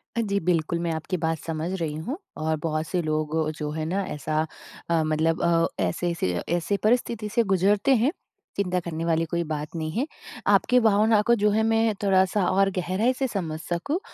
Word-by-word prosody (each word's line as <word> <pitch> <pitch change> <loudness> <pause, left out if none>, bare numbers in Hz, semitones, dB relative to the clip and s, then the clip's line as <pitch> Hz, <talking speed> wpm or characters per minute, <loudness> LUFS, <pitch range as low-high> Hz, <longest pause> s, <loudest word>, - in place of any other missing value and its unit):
अ, 235 - +1
जी 200 -2 0
बिल्कुल 170 -1 0
मैं 170 -1 -1
आपकी 160 +3 -3
बात 160 0 0
समझ 160 +1 -3
रही 155 -2 -2
हूँ, 245 - -4 0.2
और 155 0 0
बहुत 155 -1 -1
से 180 -2 0
लोग 155 0 -1 0.2
जो 150 -1 -3
है 155 0 -3
ना 195 +5 -1
ऐसा 155 +1 -1 0.5
अ, 165 -2 +3
मतलब 155 +1 +1
अ, 170 -1 +3 0.2
ऐसे 95 - -1
ऐसे 95 - -1 0.2
ऐसे 175 +4 0
परिस्थिति 225 -1 +1
से 230 +2 +2
गुजरते 200 +5 +3
हैं, 245 +6 +2 0.5
चिंता 180 -2 +1
करने 165 -1 -4
वाली 165 0 +1
कोई 170 0 0
बात 150 +1 -4
नहीं 155 -1 -3
है। 240 - 0 0.4
आपकी 250 0 +4
भावनाओं 215 -1 +4
को 235 - +3
जो 210 - +4
है 220 +1 +2
मैं 225 0 +2
थोड़ा-सा 190 0 +3
और 195 +1 +3
गहराई 185 +8 +1
से 265 +1 -1
समझ 165 -9 -3
सकूँ 180 - -2
175 Hz, 195 wpm, -25 LUFS, 160-210 Hz, 0.5 s, आपकी